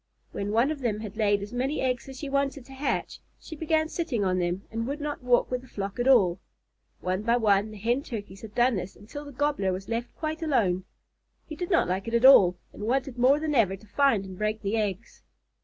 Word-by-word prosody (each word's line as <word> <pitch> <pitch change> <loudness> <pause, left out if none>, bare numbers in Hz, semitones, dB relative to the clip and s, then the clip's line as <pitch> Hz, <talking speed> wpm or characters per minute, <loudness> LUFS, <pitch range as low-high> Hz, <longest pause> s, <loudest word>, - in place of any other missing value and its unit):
When 200 - -3
one 235 +7 +3
of 310 - -4
them 220 -5 -1
had 215 -1 -7
laid 205 -2 +2
as 205 +4 -8
many 265 +5 -1
eggs 255 0 -1
as 265 - -9
she 290 - -5
wanted 275 -1 -1
to 270 - -13
hatch, 270 +2 -2 0.2
she 320 - -9
began 315 0 +1
sitting 275 - -2
on 185 -1 +1
them, 175 +2 -1
and 230 +1 -3
would 285 +3 -3
not 295 0 -4
walk 250 0 +2
with 250 0 -1
the 260 - -16
flock 200 -1 -5
at 245 - +1
all. 195 -9 +5 0.6
One 185 +2 -1
by 235 +2 +2
one 210 -2 +3
the 215 - -10
Hen 235 +6 0
Turkeys 205 -7 -7
had 215 -2 -10
done 240 -2 +3
this 180 +1 -5
until 290 +9 -9
the 285 - -9
Gobbler 285 -8 0
was 185 +1 -5
left 230 +1 -3
quite 315 0 -4
alone. 200 - +1 0.6
He 310 - -8
did 355 +2 -4
not 340 - +3
like 190 +4 -2
it 230 - -1
at 235 +2 +3
all, 185 -10 +8 0.2
and - - -11
wanted 260 0 -1
more 265 +4 +5
than 310 -1 -1
ever 210 -7 +3
to 195 - -17
find 225 -2 +2
and 185 -1 -10
break 215 +1 -1
the 200 +2 0
eggs. 210 0 -3
235 Hz, 240 wpm, -27 LUFS, 200-275 Hz, 0.6 s, all